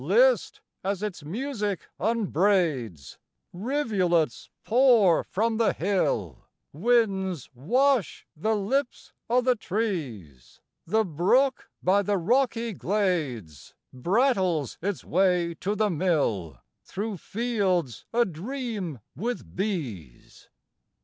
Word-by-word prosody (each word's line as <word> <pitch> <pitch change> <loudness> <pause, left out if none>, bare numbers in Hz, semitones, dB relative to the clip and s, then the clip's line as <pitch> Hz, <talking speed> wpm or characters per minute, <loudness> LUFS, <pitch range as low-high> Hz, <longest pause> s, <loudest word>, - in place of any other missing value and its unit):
List - - +3 0.2
as 195 +1 -2
its 200 -7 -4
music 210 - -3
unbraids: 175 - 0 0.3
_Rivulets 185 - 0
pour 230 -7 +5
from 225 +3 -1
the 225 -2 +2
hill, 140 - -1 0.3
Winds 190 - +1
wash 240 - +1
the 215 +8 0
lips 245 +7 -2 0.2
o' 250 +2 +4
the 250 0 +2
trees, 150 - -4 0.3
The 220 +6 +2
brook 200 - +2
by 195 +3 +4
the 200 0 0
rocky 235 +3 +1
glades 155 - -2 0.2
Brattles 180 - +1
its 200 0 -3
way 180 -1 +2
to 205 +2 -1
the 210 -1 +1
mill 145 - 0 0.3
Through 205 +1 -4
fields 190 - -1
adream 215 - -2
with 230 - -4
bees. 130 - -5
195 Hz, 95 wpm, -26 LUFS, 160-230 Hz, 0.3 s, pour